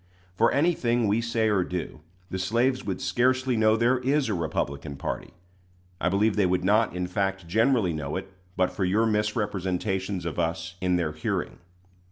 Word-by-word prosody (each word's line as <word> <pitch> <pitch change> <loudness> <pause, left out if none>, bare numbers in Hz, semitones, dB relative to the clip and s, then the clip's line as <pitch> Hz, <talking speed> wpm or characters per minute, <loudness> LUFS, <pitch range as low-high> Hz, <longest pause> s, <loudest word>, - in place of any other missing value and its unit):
For 115 +6 +3
anything 120 -7 +2
we 105 +3 +2
say 115 -1 0
or 100 -4 +2
do, 90 -4 -5 0.3
the 95 - -2
slaves 120 +7 +1
would 95 -3 -3
scarcely 130 +5 +1
know 110 0 +4
there 120 +3 +3
is 135 0 +1
a - - 0
Republican 75 -4 -3
party. - - -5 0.7
I 90 - +1
believe 100 +3 +2
they 100 -3 +3
would 90 0 0
not, 105 +1 +2
in 90 0 -1
fact, 95 0 -2
generally 110 -1 +2
know 75 -1 -4
it 95 0 -6 0.2
but 90 0 +2
for 100 - -3
your 100 +5 +2
misrepresentations 100 -3 -1
of 85 - -3
us 85 +1 -2
in 90 -1 +2
their 85 -3 0
hearing. 75 +1 -3
100 Hz, 175 wpm, -26 LUFS, 90-115 Hz, 0.7 s, know